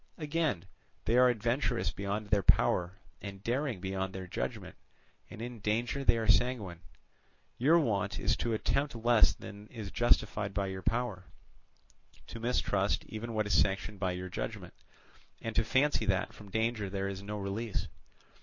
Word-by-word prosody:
Again, 150 Hz, -, -1 dB, 0.4 s
they 115 Hz, -, +2 dB
are 125 Hz, 0 st, +7 dB
adventurous 120 Hz, -, 0 dB
beyond 100 Hz, +3 st, -3 dB
their 105 Hz, -2 st, +4 dB
power, 90 Hz, 0 st, +3 dB, 0.3 s
and 100 Hz, -1 st, -8 dB
daring 125 Hz, -2 st, -1 dB
beyond 95 Hz, +1 st, -3 dB
their 95 Hz, -1 st, -5 dB
judgment, 90 Hz, -, -4 dB, 0.5 s
and 110 Hz, -, -7 dB
in 120 Hz, -1 st, -6 dB
danger 115 Hz, +6 st, 0 dB
they 115 Hz, -, +4 dB
are 110 Hz, -1 st, -1 dB
sanguine; 105 Hz, -5 st, +2 dB, 0.8 s
your 150 Hz, +7 st, +6 dB
wont 105 Hz, -9 st, 0 dB
is -, -, +2 dB
to 115 Hz, -, -1 dB
attempt 140 Hz, +5 st, 0 dB
less 115 Hz, -1 st, +5 dB
than 100 Hz, +1 st, -10 dB
is 105 Hz, -3 st, -7 dB
justified 105 Hz, -4 st, +1 dB
by 100 Hz, -, +1 dB
your 95 Hz, -1 st, -4 dB
power, 110 Hz, -4 st, -1 dB, 1.0 s
to 115 Hz, -, -8 dB
mistrust 105 Hz, -4 st, +1 dB
even 110 Hz, +1 st, -5 dB
what 110 Hz, -1 st, +1 dB
is 105 Hz, -, 0 dB
sanctioned 100 Hz, +1 st, +1 dB
by 95 Hz, -2 st, 0 dB
your 90 Hz, +1 st, -4 dB
judgment, -, -, -5 dB, 0.7 s
and 115 Hz, -1 st, -5 dB
to -, -, +4 dB
fancy 135 Hz, -4 st, +2 dB
that 95 Hz, -2 st, +1 dB
from 105 Hz, -2 st, -12 dB
danger 110 Hz, -1 st, 0 dB
there 100 Hz, 0 st, -2 dB
is 100 Hz, 0 st, -4 dB
no 105 Hz, +1 st, -5 dB
release. 100 Hz, +2 st, -2 dB
105 Hz, 160 wpm, -32 LUFS, 100-120 Hz, 1.0 s, are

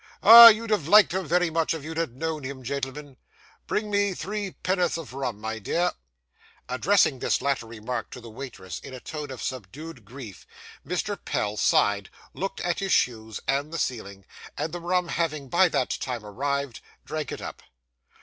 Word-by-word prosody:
Ah! 230 Hz, +3 st, +12 dB
you'd 225 Hz, 0 st, +4 dB
have 175 Hz, -9 st, +1 dB
liked 210 Hz, 0 st, +7 dB
him 190 Hz, -3 st, -2 dB
very 180 Hz, +1 st, +2 dB
much 165 Hz, 0 st, 0 dB
if 155 Hz, -, -7 dB
you 160 Hz, +2 st, -6 dB
had 160 Hz, -7 st, -3 dB
known 160 Hz, -1 st, -3 dB
him, 130 Hz, 0 st, -7 dB
gentlemen. 140 Hz, +1 st, -5 dB, 0.5 s
Bring 210 Hz, 0 st, -2 dB
me 200 Hz, -2 st, +1 dB
three 200 Hz, +4 st, -4 dB
penn'orth 180 Hz, -3 st, +1 dB
of 160 Hz, -6 st, -8 dB
rum, 130 Hz, -6 st, -4 dB
my 110 Hz, +1 st, -4 dB
dear.' 170 Hz, -, 0 dB, 0.8 s
Addressing 135 Hz, +2 st, +2 dB
this -, -, +1 dB
latter 135 Hz, -4 st, -1 dB
remark 115 Hz, +2 st, -5 dB
to -, -, -9 dB
the 115 Hz, -2 st, -11 dB
waitress, 110 Hz, -, -8 dB
in 130 Hz, -, -10 dB
a -, -, -8 dB
tone 150 Hz, +2 st, -7 dB
of 130 Hz, -2 st, -7 dB
subdued 130 Hz, +4 st, -7 dB
grief, 110 Hz, -5 st, -11 dB, 0.4 s
Mr. 180 Hz, +3 st, -3 dB
Pell 105 Hz, 0 st, -2 dB
sighed, 100 Hz, -1 st, +2 dB, 0.2 s
looked 195 Hz, +1 st, -4 dB
at 175 Hz, -, -1 dB
his 195 Hz, -1 st, -2 dB
shoes 110 Hz, -3 st, 0 dB
and 140 Hz, +3 st, 0 dB
the 165 Hz, -, -4 dB
ceiling; 100 Hz, -, -4 dB, 0.3 s
and, 160 Hz, -, -3 dB
the 175 Hz, -, -5 dB
rum 180 Hz, 0 st, 0 dB
having 155 Hz, -6 st, -2 dB
by 180 Hz, +4 st, +4 dB
that 130 Hz, -, 0 dB
time 120 Hz, -4 st, -4 dB
arrived, 140 Hz, +3 st, -3 dB, 0.2 s
drank 155 Hz, -4 st, -4 dB
it -, -, -5 dB
up. -, -, -8 dB
140 Hz, 180 wpm, -26 LUFS, 125-175 Hz, 0.8 s, Ah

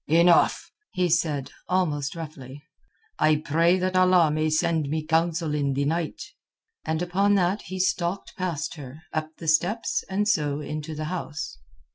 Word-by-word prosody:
"Enough," 170 Hz, +2 st, +4 dB, 0.2 s
he 180 Hz, -1 st, +1 dB
said 155 Hz, -4 st, 0 dB, 0.2 s
almost 155 Hz, -6 st, 0 dB
roughly. 145 Hz, -4 st, -9 dB, 0.6 s
"I 155 Hz, 0 st, +4 dB
pray 165 Hz, +4 st, +2 dB
that 185 Hz, 0 st, -1 dB
Allah 185 Hz, -3 st, +5 dB
may 155 Hz, +1 st, +1 dB
send 160 Hz, -2 st, +1 dB
me 155 Hz, +1 st, -2 dB
counsel 165 Hz, 0 st, +1 dB
in 140 Hz, -2 st, 0 dB
the 140 Hz, +1 st, 0 dB
night." 165 Hz, +2 st, -2 dB, 0.6 s
And 160 Hz, +2 st, -1 dB
upon 195 Hz, +3 st, +2 dB
that 190 Hz, +2 st, +1 dB
he 185 Hz, +2 st, -6 dB
stalked 185 Hz, 0 st, -1 dB
past 170 Hz, -5 st, -3 dB
her, 145 Hz, +2 st, -10 dB
up 155 Hz, 0 st, -2 dB
the 165 Hz, -, -8 dB
steps, 200 Hz, -, +1 dB
and 205 Hz, +2 st, 0 dB
so 150 Hz, -7 st, +1 dB
into 155 Hz, +1 st, -5 dB
the 155 Hz, +1 st, -4 dB
house. 155 Hz, -, -5 dB
160 Hz, 155 wpm, -25 LUFS, 150-180 Hz, 0.6 s, Allah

